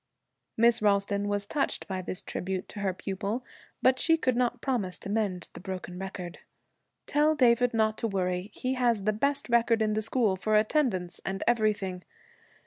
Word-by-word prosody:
Miss 235 0 +4
Ralston 200 0 +2
was 205 0 -1
touched 280 +7 -1
by 190 -1 -3
this 185 0 -5
tribute 185 0 -4
to - - -8
her 200 -1 0
pupil, 200 +6 -4 0.4
but 260 0 +4
she 325 0 +4
could 255 -6 +1
not 245 0 0
promise 235 -9 -1
to - - -7
mend 200 -5 -1
the - - -9
broken 185 -1 -6
record. 185 -2 -6 0.7
'Tell 300 +1 +3
David 245 -3 +4
not 220 -1 +1
to 230 - 0
worry. 185 -1 -1
He 255 +1 -1
has 240 -5 +1
the 215 +2 +2
best 280 +6 0
record 235 -1 +3
in 215 -1 +1
the 215 - 0
school, 220 -3 +1
for 215 +3 0
attendance 215 - +1
and 195 +1 -3
everything. 210 -6 +1
215 Hz, 175 wpm, -28 LUFS, 190-240 Hz, 0.7 s, Miss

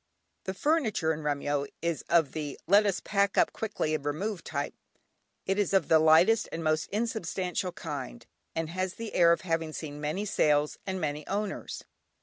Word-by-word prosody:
The 190 - -3
furniture 220 - +1
in 155 - -6
Remyo 145 -1 -1
is 170 -2 -2
of 165 -5 +4
the 150 -3 -5
"let 205 +3 +5
us 195 - 0
pack 200 -1 +1
up - - +4
quickly 205 -8 -2
and 155 - -1
remove" 170 +6 -2
type. 145 -2 -3 0.7
It 195 +2 0
is 200 -1 +1
of 190 - +2
the 160 - +7
lightest 165 +8 +5
and 165 - -4
most 155 0 +1
unsubstantial 190 -4 -2
kind, - - -6 0.3
and 160 -1 -2
has 185 +1 -2
the 225 -1 -6
air 170 -1 +6
of 170 - +2
having 165 -3 -2
seen 150 -2 -6
many 155 +8 -2
sales 150 -6 +2
and 190 0 -2
many 150 -2 -3
owners. 200 0 -3
170 Hz, 175 wpm, -29 LUFS, 155-200 Hz, 0.7 s, the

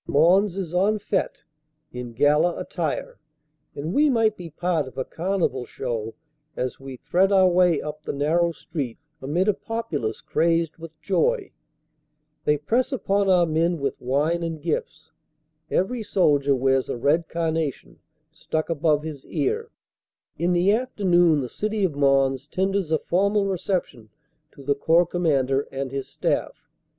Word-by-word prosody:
Mons 180 +6 +3
is 180 -4 -4
en 200 +4 +2
fete, 205 - -2 0.5
in 125 -1 -6
gala 150 +7 +3
attire; - - -4 0.6
and 155 +5 -4
we 295 +1 +4
might 225 -4 +2
be 175 -4 -9
part 165 -2 -1
of 130 - -12
a 130 - -2
carnival 175 -7 -1
show 115 -2 -4 0.4
as 125 0 -3
we 135 -1 -8
thread 190 +9 +2
our 190 -1 +6
way 180 -3 +3
up 150 0 -6
the - - -4
narrow 165 +5 +1
street 140 -7 -5 0.2
amid 160 +9 0
a 210 - +4
populace 175 - -4
crazed 165 -1 0
with 165 -1 -11
joy. 420 - 0 0.9
They 150 - +3
press 230 - 0
upon 200 -6 +1
our 180 -2 +5
men 165 +2 +1
with 140 -3 -3
wine 145 +7 0
and 165 -2 -3
gifts; 160 0 -4 0.6
every 235 +6 0
soldier 145 -9 +2
wears 135 0 +1
a - - -2
red 155 +7 +1
carnation, 160 -3 -2 0.3
stuck 160 +1 -3
above 150 -1 +1
his 150 -4 -7
ear. 450 +2 -1 0.7
In 175 +1 0
the 180 +3 +3
afternoon 175 - +2
the 125 - -3
City 215 - -2
of 180 -5 +1
Mons 135 -1 +2
tenders 190 0 -1
a 160 - +4
formal 200 +5 +1
reception 180 - -3 0.4
to 140 - -13
the 140 +1 +2
Corps 165 +5 +3
Commander 140 -6 +1
and 135 -1 -4
his 135 -1 -4
staff. - - -3
165 Hz, 150 wpm, -24 LUFS, 140-190 Hz, 0.9 s, our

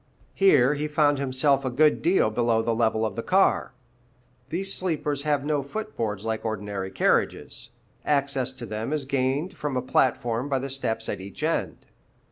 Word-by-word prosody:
Here 150 -9 +4
he 150 +1 -2
found 150 -2 +2
himself 140 +1 +2
a 130 - -1
good 150 +5 +3
deal 175 - +3
below 115 0 +1
the 115 - 0
level 110 -1 +1
of 110 - -3
the 115 - -2
car. 190 +1 +2 0.8
These 195 +3 -1
sleepers 150 -5 -1
have 145 -1 0
no 150 -1 +1
foot 145 +3 -6
boards 105 -4 -3
like 110 -1 -2
ordinary 105 -3 -3
carriages; 95 - 0 0.3
access 140 -3 0
to 125 -2 -8
them 110 +5 -4
is 150 -3 -2
gained 140 +6 -1
from 145 -3 -3
a - - 0
platform 125 0 +1
by 135 - +1
the 135 +1 -4
steps 120 -4 -2
at - - -4
each 95 +1 -9
end. - - -2
135 Hz, 175 wpm, -25 LUFS, 115-150 Hz, 0.8 s, Here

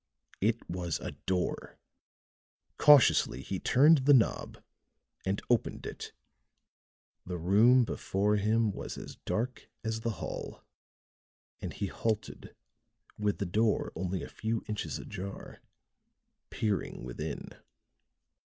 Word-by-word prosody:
It 110 +3 +1
was 85 -3 -3
a - - -5
door; 90 +5 -3 1.0
cautiously 130 - +6
he 95 - -3
turned 150 +4 +5
the 140 +2 +6
knob 115 - +1 0.7
and 95 +1 0
opened 120 -2 0
it. - - -7 1.1
The 90 -1 -4
room 110 +9 +5
before 105 0 0
him 110 +1 +2
was - - -6
as - - -9
dark 120 +3 -2
as 110 0 -2
the 115 0 -2
hall; - - -6 1.0
and - - -4
he 100 - -3
halted 110 +2 -3 0.6
with 105 -1 0
the 100 - -2
door 105 +4 +1
only 90 +2 -2
a - - -6
few 115 0 -3
inches 105 -1 -3
ajar, 100 -1 -8 0.9
peering 105 - -2
within. 70 +5 -5
105 Hz, 115 wpm, -31 LUFS, 95-115 Hz, 1.1 s, cautiously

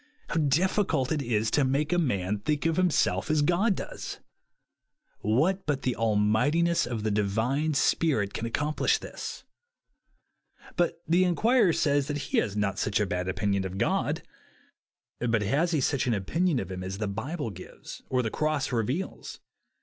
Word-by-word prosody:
How - - -1
difficult 155 -1 +1
it 155 -2 0
is 115 -3 0
to 145 - +3
make 140 +5 +1
a 175 - +3
man 105 - 0
think 150 +7 -1
of 165 -1 +2
himself 150 - +2
as 155 -1 +3
God 185 +7 +2
does! - - -6 1.0
What 155 - +1
but 140 -3 -1
the 125 - 0
almightiness 115 +11 +2
of 115 -3 -3
the 110 - 0
Divine 115 +9 0
Spirit 135 -11 +1
can 115 - -3
ac 115 - -9
complish 150 +1 +1
this? - - -7 1.3
But 170 -1 0
the 175 +3 +4
inquirer 210 +3 +3
says 145 -3 +1
that 145 - -2
he - - 0
has 105 -1 -2
not 100 0 0
a 105 - +2
bad 90 -1 -2
opinion 95 +1 0
of 95 0 -5
God. - - 0 1.0
But 115 -3 +1
has 145 - +1
he 160 -3 +1
such 135 -1 0
an 120 - +2
opinion 160 - 0
of 95 -3 -5
him 90 0 -5
as 95 +1 -5
the 105 0 -2
Bible 120 - -4
gives 95 -1 -10
or 130 -1 +1
the 110 - -2
cross 155 -3 -1
reveals 125 - -3
135 Hz, 165 wpm, -28 LUFS, 105-160 Hz, 1.3 s, the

